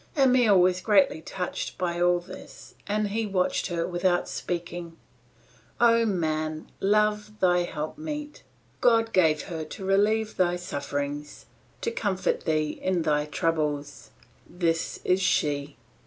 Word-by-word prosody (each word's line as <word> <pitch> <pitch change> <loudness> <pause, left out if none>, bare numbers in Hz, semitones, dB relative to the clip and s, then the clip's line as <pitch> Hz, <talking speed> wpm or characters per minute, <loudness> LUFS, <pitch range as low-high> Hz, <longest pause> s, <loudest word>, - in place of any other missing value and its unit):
Emile 250 -7 +5
was 180 0 +3
greatly 195 -6 +3
touched 180 +2 -5
by 175 -1 -2
all 175 0 +4
this 175 +2 -12
and 210 0 0
he 225 +3 -1
watched 185 -2 0
her 170 -2 -1
without 175 0 0
speaking. 175 -1 -5 0.8
O 230 -1 +5
man, 155 -4 -2
love 210 +1 +1
thy 180 -1 +4
helpmeet. 295 - -5 0.4
God 225 -1 +3
gave 160 -5 +3
her 160 -2 -5
to 190 +5 -8
relieve 210 +3 +2
thy 175 -2 +2
sufferings, 145 -3 -5 0.4
to 460 - -1
comfort 200 - -1
thee 155 -2 0
in 185 -3 0
thy 150 -1 +1
troubles. 150 -2 -2 0.4
This 165 -2 -1
is 185 +1 +2
she! 145 -5 0
180 Hz, 125 wpm, -26 LUFS, 160-210 Hz, 0.8 s, Emile